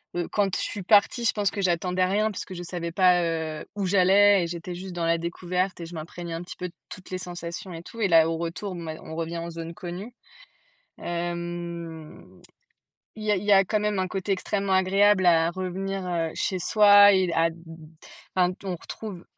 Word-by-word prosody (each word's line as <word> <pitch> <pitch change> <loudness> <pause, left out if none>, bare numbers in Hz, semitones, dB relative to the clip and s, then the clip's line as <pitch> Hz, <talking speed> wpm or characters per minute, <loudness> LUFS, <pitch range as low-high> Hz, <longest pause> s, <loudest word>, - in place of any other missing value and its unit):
heu, 175 -1 -1
quand 200 -3 0
je - - -1
suis 200 - -3
partie, 215 +4 +4
je - - +3
pense 205 -2 0
que 200 - -4
j'attendais 180 0 +1
rien 210 +3 +1
puisque 190 - -7
je 175 - -6
savais 170 -1 -4
pas, 180 0 +4
heu, 160 -2 -3
où 200 -2 -2
j'allais 195 +1 +5
et 170 - -2
j'étais 175 +1 -6
juste 185 +1 -7
dans 170 -1 -1
la 165 0 +2
découverte 180 +2 -2
et - - -5
je 170 - -11
m'imprégnais 170 +2 -7
un 165 - -4
petit - - -9
peu 180 - -4
de - - -22 0.2
toutes 185 - -10
les 185 - -2
sensations 175 0 -6
et 165 0 -8
tout. 230 +5 -9
Et 205 - +3
là, 165 -1 +6
au 165 - -2
retour, 170 +4 -4
mais 160 -2 -6
on 160 - -8
revient 165 +1 -3
en 170 +1 -5
zone 165 0 -7
connue. 180 +7 -7 0.9
Hem, 170 - -6 0.8
il 215 - -7
y 210 - +2
a 205 - +3
il 185 - -4
y 205 - +3
a 195 0 +6
quand 215 +3 0
même 210 -1 0
un 185 0 0
côté 195 +1 -2
extrêmement 195 +1 -1
agréable 190 +1 +4
à 165 -1 +4
revenir, 185 +1 -4
heu, 165 -2 -1
chez 190 - -1
soi 205 +1 +7
et 190 -2 +2
d - - -2
à 165 +1 +3
d 165 - -13 0.8
enfin 180 0 +3
on 190 - -2
retrouve 185 +1 -8
180 Hz, 215 wpm, -26 LUFS, 170-195 Hz, 0.9 s, soi